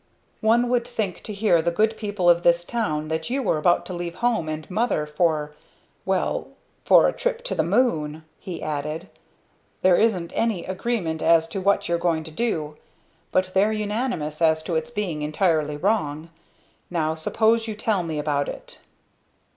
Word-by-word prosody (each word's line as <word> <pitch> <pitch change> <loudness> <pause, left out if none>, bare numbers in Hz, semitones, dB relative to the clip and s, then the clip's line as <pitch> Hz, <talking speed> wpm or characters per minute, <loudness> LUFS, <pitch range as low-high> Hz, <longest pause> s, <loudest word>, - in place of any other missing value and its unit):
"One 235 +3 +3
would 240 -1 +1
think 215 -7 -3
to - - -5
hear 200 -5 +2
the 170 - +1
good 215 +6 +1
people 205 -5 -2
of 175 0 +6
this 175 0 +3
town 155 -11 -2
that 160 +5 -2
you 265 +2 -1
were 160 -8 +1
about 175 +3 +2
to 185 - -6
leave 175 -1 -5
home 230 -9 0
and 155 -1 -5
mother 205 -6 0
for 150 -1 0 0.5
well, - - 0 0.4
for - - +6
a - - 0
trip - - -2
to - - -2
the - - +1
moon!" 155 -11 0
he 185 -4 -7
added. 155 +3 -4 0.7
"There 185 -1 +6
isn't 190 -7 +1
any 220 -7 0
agreement 185 -4 -2
as 165 -1 +4
to 190 +3 -4
what 200 +1 +2
you're 170 0 0
going 165 -2 0
to 160 - -9
do, 155 -7 -2 0.5
but 185 0 +1
they're 200 +3 +3
unanimous 210 - -2
as 160 -1 +3
to 170 - -3
its 160 - -1
being 200 -10 -3
entirely 155 -1 +1
wrong. 165 -4 -1 0.6
Now 160 -3 0
suppose 225 +8 +1
you 215 - -4
tell 215 -2 0
me 160 -3 -4
about 145 -1 0
it." - - -10
175 Hz, 175 wpm, -24 LUFS, 155-215 Hz, 0.7 s, of